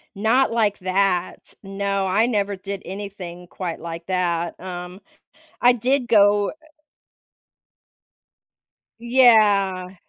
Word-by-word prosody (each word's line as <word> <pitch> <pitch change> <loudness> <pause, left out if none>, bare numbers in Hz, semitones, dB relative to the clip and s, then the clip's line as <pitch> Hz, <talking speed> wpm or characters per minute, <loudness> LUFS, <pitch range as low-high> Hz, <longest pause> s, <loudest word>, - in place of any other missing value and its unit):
Not 230 +6 +2
like 215 -3 +1
that, 185 -1 -1
no, 195 0 -2
I 195 +4 +2
never 205 -4 -1
did 195 +1 -6
anything 185 -2 -8
quite 175 -2 -6
like 170 0 -8
that, 175 -2 -2
um, 180 0 -8 0.6
I 245 - +5
did 250 +2 0
go 205 -2 +4 2.5
Yeah. 210 -7 +3
195 Hz, 95 wpm, -22 LUFS, 180-215 Hz, 2.5 s, I